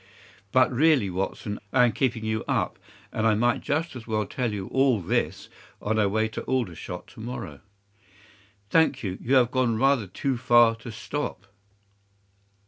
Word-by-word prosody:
But 130 0 +4
really, 130 - +3
Watson, 95 +2 -3
I 125 -2 +5
am 120 - +2
keeping 120 -1 -1
you 110 0 -1
up, - - -1 0.3
and 110 0 +1
I 110 - +4
might 120 +3 +1
just 160 +2 -2
as 115 -2 -9
well 110 -1 0
tell 120 +3 -2
you 100 -2 -4
all 130 -4 +3
this 85 - -1 0.3
on 110 +1 -1
our 100 -2 +3
way 110 +2 +1
to - - -5
Aldershot 90 -8 -3
to - - -15
morrow." 110 - -6 1.1
"Thank 160 -5 +3
you, 95 -2 -4
you 130 +3 +1
have 125 -2 +4
gone 125 -4 +1
rather 135 -3 +2
too 130 +8 -2
far 120 -2 +5
to 115 +1 -9
stop." 110 -3 -5
115 Hz, 165 wpm, -26 LUFS, 105-130 Hz, 1.1 s, I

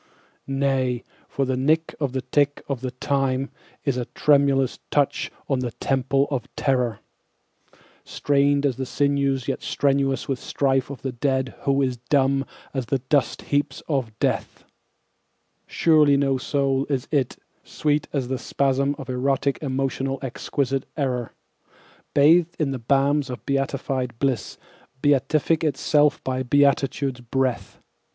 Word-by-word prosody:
Nay, 135 -3 0 0.2
for 135 - -1
the 130 0 0
nick 155 +5 +1
of 140 -4 -1
the 130 -1 -2
tick 145 +1 +1
of 135 -4 -3
the 130 - -2
time 135 +1 -1 0.3
is 140 -3 +1
a 125 - -2
tremulous 140 -2 +2
touch 145 -2 +1 0.2
on 135 -2 +1
the 125 -1 -2
temples 135 +1 +1
of 135 -4 -3
terror, 125 -5 0 1.0
Strained 140 0 +1
as 130 -3 0
the 130 - -2
sinews 140 -2 0
yet - - -2
strenuous 135 -2 0
with 135 -2 -2
strife 135 -2 0
of 140 - -8
the 135 - -2
dead 130 +1 -1
who 140 0 +3
is 130 -2 -1
dumb 135 +2 +1 0.3
as 130 -4 -3
the 135 - +1
dust 130 0 0
heaps 145 -1 -1
of 130 -8 -2
death; - - -2 1.0
Surely 150 -4 +4
no 135 -1 +1
soul 135 0 0
is 135 -4 -1
it, 140 -5 0 0.3
sweet 150 0 -1
as 135 -4 -1
the 130 0 -2
spasm 140 +1 0
of 135 - -8
erotic 135 +2 0
emotional 135 -1 -1
exquisite 135 +1 -2
error, 125 -5 -1 0.8
Bathed 165 +4 +5
in 150 -4 0
the 130 - -3
balms 140 +3 +2
of 125 - -7
beatified 135 -2 -1
bliss, 130 -4 -1 0.4
beatific 150 +3 +2
itself 150 0 +2
by 130 0 -1
beatitude's 135 0 +2
breath. 130 +1 -2
135 Hz, 140 wpm, -24 LUFS, 130-140 Hz, 1.0 s, Bathed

